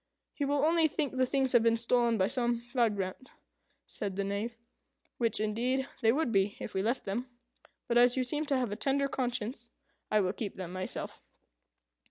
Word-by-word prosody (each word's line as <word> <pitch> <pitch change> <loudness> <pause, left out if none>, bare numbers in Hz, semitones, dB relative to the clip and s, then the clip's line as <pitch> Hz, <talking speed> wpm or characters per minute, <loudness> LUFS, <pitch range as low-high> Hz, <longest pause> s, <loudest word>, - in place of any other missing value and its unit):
"He 285 - -2
will 285 +1 +2
only 325 0 +4
think 295 -3 -2
the 255 0 +2
things 265 -1 +1
have 240 - +6
been 230 0 +3
stolen 235 0 +3
by 190 - +3
some 240 +2 0
vagrant," 215 -2 0 0.6
said 200 -2 -4
the 200 - -1
Knave 210 +4 -3 0.6
"which, 230 -4 0
indeed, 245 +5 0
they 225 - +5
would 280 -1 0
be 200 -1 +1
if - - -6
we 190 - 0
left 235 +6 0
them. 230 +6 -3 0.6
But 240 0 +4
as 245 +1 +5
you 260 - +2
seem 295 +4 -2
to 275 - +2
have 250 -5 -1
a - - -2
tender 275 +4 +1
conscience, 250 -2 -3 0.4
I 215 - +3
will 185 0 0
keep 210 -1 -5
them 180 -2 -6
myself." 185 0 -4
240 Hz, 190 wpm, -31 LUFS, 210-265 Hz, 0.6 s, have